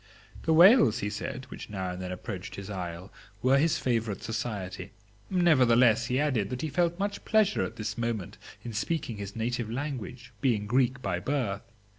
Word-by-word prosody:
The 160 - +3
whales, 175 - +7
he 105 - -2
said, 125 +4 -5
which - - -9
now 95 -3 -3
and 90 0 -6
then 90 0 -4
approached 90 0 -6
his 100 +1 -7
isle, 90 -1 -6 0.3
were 135 +2 +5
his 160 +2 +2
favorite 115 -5 -1
society. 100 -5 -4 0.4
Nevertheless, 125 - +4
he 125 +2 +1
added 130 -9 +1
that 125 +2 -4
he 155 - -1
felt 170 +2 +1
much 200 +1 -3
pleasure 215 -2 +3
at - - -5
this 110 +2 -4
moment 115 -5 -3 0.2
in 120 - -6
speaking 115 0 -2
his 100 -1 -7
native 115 0 -2
language, 125 -2 -5
being 110 -6 +1
Greek 125 +3 +1
by 90 -3 -1
birth. 110 -4 -1
120 Hz, 175 wpm, -28 LUFS, 100-135 Hz, 0.4 s, whales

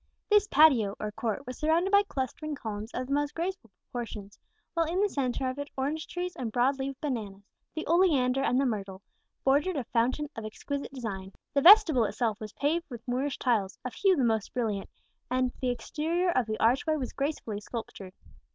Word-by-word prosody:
This 415 0 +5
patio, 265 - +5
or 210 - -3
court, 225 +4 -3
was 255 - -7
surrounded 330 +5 +2
by 405 0 +7
clustering 300 - -4
columns 215 -4 -5
of 255 - -3
the 275 - -3
most 290 0 0
graceful 345 - -3
proportions; 205 0 -8 0.3
while 330 -2 +1
in 350 +3 -1
the 415 - +4
centre 265 -6 -1
of 255 +2 -3
it 285 0 -5
orange 295 +4 -2
trees 360 0 -4
and 235 -3 -4
broad 260 +4 +2
leaved 270 0 -4
bananas, 215 -9 -4 0.3
the 315 - -3
oleander 285 -7 +3
and 255 -1 +2
the 275 - +2
myrtle, 195 -5 -3 0.4
bordered 290 +6 +2
a 270 - -1
fountain 245 +6 0
of 225 - -6
exquisite 280 +6 -5
design. 200 -7 -6 0.2
The 280 - +3
vestibule 335 - +8
itself 220 -1 -1
was 215 -1 -7
paved 320 +4 -1
with 240 -2 -9
Moorish 255 +3 -1
tiles, 215 -7 0
of 255 - -4
hue 390 -2 +3
the 275 - +1
most 220 -2 0
brilliant; 215 -5 -1 0.4
and 255 0 +1
the 255 - +1
exterior 330 +8 -1
of 255 -8 +1
the 215 0 -3
archway 260 +7 +3
was 265 -5 -4
gracefully 275 -7 -3
sculptured. 205 -4 -7
260 Hz, 190 wpm, -29 LUFS, 225-305 Hz, 0.4 s, vestibule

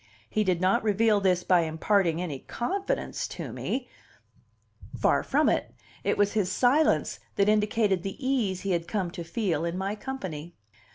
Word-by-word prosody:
He 215 - 0
did 185 -4 +1
not 185 +2 +3
reveal 215 0 +3
this 180 -2 +2
by 180 -2 +4
imparting 165 +2 +1
any 160 -7 -4
confidence 385 - -3
to - - -7
me; 255 -1 -3 1.1
far - - +3
from - - +2
it; - - 0 0.3
it - - +1
was 205 0 +2
his 200 -4 +1
silence 270 +8 +2 0.2
that 200 - +3
indicated 210 -2 +2
the 195 +2 -5
ease 250 -9 0
he 195 - -2
had 170 -1 -1
come 190 -5 -2
to 170 - -6
feel 170 -4 -1
in 170 +1 -2
my 195 +2 -2
company. 190 - -6
195 Hz, 165 wpm, -27 LUFS, 175-220 Hz, 1.1 s, by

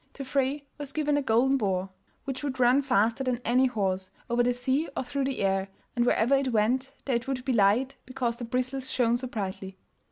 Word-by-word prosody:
To 275 - -7
Frey 275 +2 0
was 285 -2 -7
given 300 -1 0
the 290 - +2
golden 265 +2 +3
boar, 190 -4 -1 0.3
which 270 0 -5
would 265 -3 -3
run 250 +3 +5
faster 240 -1 +2
than 250 -2 0
any 255 +2 +4
horse, 190 -5 -1 0.2
over 240 +1 +3
the 245 +1 +3
sea 260 +5 0
or - - 0
through 275 +2 -2
the 265 -4 -2
air, 195 0 +1 0.3
and 240 0 +2
wherever 240 +3 +3
it 270 -1 +2
went, 245 +5 +1
there 260 -4 +2
it 235 +3 -8
would 265 -1 -3
be 265 - +1
light, 235 +6 +3
because 250 -3 -2
the 240 - -6
bristles 255 +2 -2
shone 240 -1 +2
so 255 +1 -5
brightly. 190 -4 -5
250 Hz, 215 wpm, -28 LUFS, 230-270 Hz, 0.3 s, run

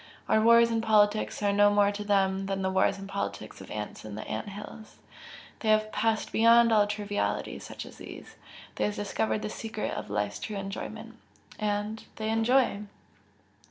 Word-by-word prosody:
Our 220 - +3
wars 235 +1 +6
and 225 -1 +1
politics 215 -1 +2
are 200 0 +2
no 205 0 +5
more 205 0 +3
to 205 0 -5
them 195 -1 +1
than 195 -1 -2
the 190 - 0
wars 190 - +2
and 195 0 -8
politics 200 0 -5
of - - -11
ants 105 -1 -6
in 105 -1 -7
ant 110 - -5
hills, 210 +2 -10 0.6
they 220 - -1
have 215 0 +3
passed 225 -1 0
beyond 230 +1 +5
all 210 -1 +4
trivialities 205 0 -2
such - - -8
as - - -13
these. - - -10 0.4
They - - +1
have 210 - -2
discovered 210 +1 -1
the - - -3
secret 220 -1 -4
of - - -5
life's 105 0 -2
true 210 -2 -5
enjoyment 195 0 -7 0.4
and 210 +1 -2
they 220 0 -2
enjoy!" 225 0 +2
210 Hz, 175 wpm, -28 LUFS, 195-220 Hz, 0.6 s, wars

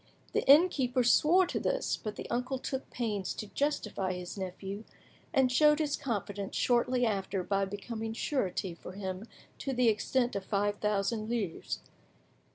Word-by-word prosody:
The - - +2
innkeeper 275 -5 +5
swore 330 +9 +5
to - - -2
this, - - 0
but 215 -2 -6
the - - -6
uncle 250 +2 -1
took 265 +1 -4
pains 210 -6 -2
to - - -5
justify 210 -9 -1
his 180 -1 -6
nephew, 195 +2 -5 0.5
and 265 -4 +3
showed 300 +3 +5
his 300 -2 0
confidence 205 -5 -3
shortly 245 0 +2
after 195 -3 -1
by 195 +1 +1
becoming 220 +3 -5
surety 200 - -1
for 175 +2 -10
him 190 +2 -5 0.3
to 270 - -2
the 250 -2 +4
extent 240 +3 +1
of 200 - -2
five 205 +1 0
thousand 210 +1 0
livres. 210 -8 -2
225 Hz, 155 wpm, -31 LUFS, 195-255 Hz, 0.5 s, innkeeper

